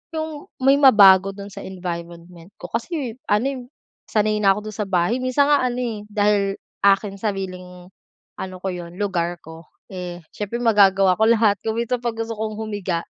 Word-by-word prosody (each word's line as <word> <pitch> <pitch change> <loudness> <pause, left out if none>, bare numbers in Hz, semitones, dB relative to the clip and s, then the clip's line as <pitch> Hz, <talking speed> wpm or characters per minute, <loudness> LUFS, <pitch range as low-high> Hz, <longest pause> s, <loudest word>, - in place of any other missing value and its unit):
yung 315 -2 -5 0.2
may 270 +1 +6
mabago 195 -8 +7
do'n 200 0 -9
sa - - -9
environment 170 -2 -6 0.3
ko, - - -10
kasi, 245 -1 -4
ano, 210 +4 +2
eh, 265 - -6 0.5
sanay 215 0 +1
na 195 -2 +4
ako 210 - -4
do'n - - -12
sa - - -8
bahay. 185 +6 +1
Minsan 280 +3 +2
nga 290 - +5
ano, 245 0 -3
eh, 225 -3 -3
dahil 205 -1 +1 0.3
aking 195 0 +3
sariling 185 -3 -5 0.5
ano 185 -1 -6
ko 190 - -1
'yon 175 -1 -7
lugar 175 -3 -1
ko 160 +1 -12 0.2
eh 180 -2 -6 0.2
siyempre 210 +3 -4
magagawa 195 -4 +4
ko 220 - +2
lahat. 220 -2 +4
Kung 220 0 -2
minsan 235 +2 -1
'pag 235 -1 -1
gusto 225 0 -4
kong 215 0 -4
humiga, 205 -6 -3
205 Hz, 180 wpm, -22 LUFS, 185-230 Hz, 0.5 s, mabago